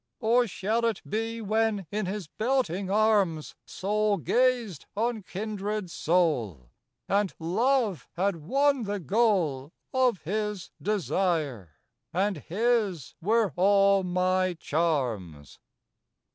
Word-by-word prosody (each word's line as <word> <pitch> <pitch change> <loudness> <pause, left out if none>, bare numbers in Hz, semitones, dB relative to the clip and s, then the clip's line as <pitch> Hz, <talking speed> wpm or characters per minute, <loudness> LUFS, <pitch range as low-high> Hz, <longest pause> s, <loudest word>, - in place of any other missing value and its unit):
"Or 240 +1 +3
shall 215 +4 -1
it 225 -4 0
be 225 +2 -3
when, 215 -2 0
in 210 -2 -2
his 200 0 -4
belting 215 - -1
arms, 200 -7 +2
Soul 210 +1 0
gazed 240 - +1
on 230 0 0
kindred 205 0 -4
soul, 120 - 0 0.4
And 200 -1 +1
love 215 - 0
had 190 0 0
won 270 - +1
the 205 0 -2
goal 170 - +1 0.2
Of 255 -6 +2
his 210 +1 -3
desire, 165 - -1 0.4
and 195 +1 0
his 200 - 0
were 215 -1 +2
all 195 +1 +4
my 185 0 +1
charms? 120 - -2
200 Hz, 105 wpm, -27 LUFS, 170-220 Hz, 0.4 s, all